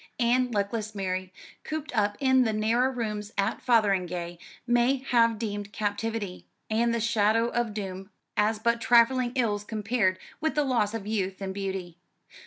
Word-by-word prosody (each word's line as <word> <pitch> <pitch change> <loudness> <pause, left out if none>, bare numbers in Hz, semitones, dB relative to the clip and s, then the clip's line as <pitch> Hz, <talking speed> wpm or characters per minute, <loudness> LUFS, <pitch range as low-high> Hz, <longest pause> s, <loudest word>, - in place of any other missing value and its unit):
And 245 +1 +2
luckless 210 +1 -2
Mary, 185 -1 -3 0.3
cooped 310 -3 -5
up 205 -1 +1
in 260 -1 +4
the 220 -2 0
narrow 230 +4 +2
rooms 215 -4 -4
at 200 +3 0
Fotheringay, 180 -7 +1 0.3
may 240 +2 +3
have 235 -4 +2
deemed 205 -2 -4
captivity, 205 -2 -3 0.2
and 235 +2 +2
the 235 - 0
shadow 225 +1 +2
of 235 -3 -1
doom, 190 -1 -5 0.3
as 210 +1 +2
but 235 +2 0
trifling 240 +1 +4
ills 210 -5 0
compared 210 -3 0 0.2
with 315 0 -1
the 300 - +3
loss 230 -5 +1
of 215 -3 -5
youth 195 -3 -2
and 190 -1 -4
beauty. 190 -3 -5
215 Hz, 155 wpm, -27 LUFS, 200-235 Hz, 0.3 s, in